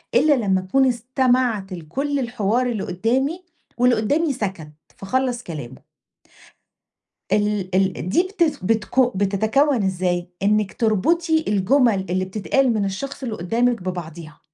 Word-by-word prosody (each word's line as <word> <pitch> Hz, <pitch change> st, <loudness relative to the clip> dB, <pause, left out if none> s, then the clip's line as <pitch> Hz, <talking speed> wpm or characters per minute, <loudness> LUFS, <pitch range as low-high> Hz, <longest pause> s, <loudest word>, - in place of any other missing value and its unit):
إلّا 305 Hz, -1 st, +5 dB
لمّا 190 Hz, -6 st, +1 dB
أكُون 265 Hz, +9 st, +2 dB
استمعت 245 Hz, -4 st, 0 dB
لكلّ 275 Hz, -, -3 dB
الحوار 240 Hz, 0 st, 0 dB
اللي 225 Hz, -5 st, -2 dB
قُدّامي 260 Hz, -, -1 dB, 0.3 s
واللي 245 Hz, 0 st, +4 dB
قُدّامي 285 Hz, +8 st, +1 dB
سَكَت 190 Hz, -10 st, -5 dB, 0.3 s
فخلّص 250 Hz, +4 st, -1 dB
كلامه. 140 Hz, -7 st, -8 dB, 1.5 s
ال 210 Hz, -3 st, 0 dB
ال 185 Hz, -2 st, 0 dB
دي 345 Hz, -, +3 dB
بتث 330 Hz, -7 st, +1 dB
بتك 225 Hz, +3 st, +1 dB
بتتكوّن 220 Hz, +6 st, +2 dB
ازاي؟ 180 Hz, -2 st, -1 dB
إنِك 210 Hz, -1 st, +1 dB
تربُطي 320 Hz, -, +1 dB
الجُمل 210 Hz, 0 st, +2 dB
اللي 185 Hz, +1 st, 0 dB
بتتقال 225 Hz, +6 st, +1 dB
من 205 Hz, -2 st, 0 dB
الشخص 270 Hz, +8 st, -5 dB
اللي 225 Hz, -4 st, -3 dB
قُدّامِك 230 Hz, +5 st, 0 dB
ببعضيها، 165 Hz, -4 st, -7 dB
220 Hz, 125 wpm, -21 LUFS, 190-260 Hz, 1.5 s, إلّا